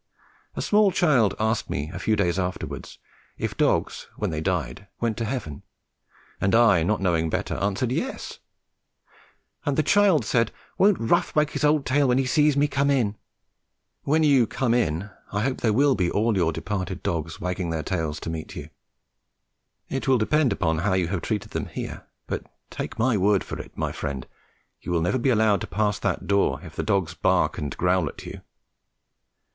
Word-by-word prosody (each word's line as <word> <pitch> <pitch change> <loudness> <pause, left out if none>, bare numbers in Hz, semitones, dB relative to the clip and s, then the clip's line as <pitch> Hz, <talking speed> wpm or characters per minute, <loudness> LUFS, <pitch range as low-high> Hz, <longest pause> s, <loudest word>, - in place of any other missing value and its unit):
A - - -2
small 210 -1 +4
child 140 - +3
asked 110 +1 0
me 75 +3 -3
a 90 - -5
few 110 +3 +1
days 90 -3 +1
afterwards 90 0 -4 0.4
if - - -3
dogs - - 0
when - - -2
they 80 -1 -3
died 90 -1 -2
went 115 -2 0
to 115 - -2
heaven, 105 - -4 0.8
and 95 +3 +2
I, 115 -7 +5
not 100 +6 0
knowing 85 -3 +1
better, - - -2
answered, 100 +5 -1
"Yes"; 245 - -4 1.2
and 145 -3 -1
the 155 - +3
child 190 - +4
said, 115 0 +1 0.3
"Won't 200 0 +5
Rough 115 - +1
wag 150 -1 +2
his - - -3
old 150 -1 +3
tail 140 +2 +2
when 125 0 +3
he 135 - +2
sees 150 +2 +3
me 145 +1 +4
come 140 0 +1
in?" 120 -7 +1 0.9
When 155 +3 +2
you 135 -6 +4
"come 120 0 0
in" 100 -4 0 0.2
I 100 - -1
hope 130 +3 0
there 110 - +2
will 140 +5 +4
be 90 -7 0
all 110 +3 +1
your 85 -3 +2
departed 95 +3 -4
dogs 80 -1 -3
wagging 90 -1 -2
their 80 -1 -2
tails 80 -3 -2
to - - -5
meet 80 -1 -6
you. - - -7 1.2
It 135 - -3
will 130 -1 +5
depend 135 +4 +2
upon 80 -5 0
how 95 +3 +1
you 90 -3 +1
have 95 -2 -2
treated 105 -1 -3
them - - -3
here; - - -7 0.2
but - - -4 0.2
take - - -5
my 120 0 +2
word 100 0 +3
for - - -7
it, - - -10
my - - -1
friend, 70 -3 -4 0.6
you - - -5
will 85 -2 +1
never 90 +10 +1
be 130 - +1
allowed 110 -4 +3
to - - -4
pass 105 +2 0
that - - -1
door 100 0 +2
if - - -11
the - - -1
dogs 95 -6 0
bark 80 - +1
and 75 -3 -4
growl 90 -3 +2
at - - -11
you. - - -8
105 Hz, 190 wpm, -25 LUFS, 90-130 Hz, 1.2 s, I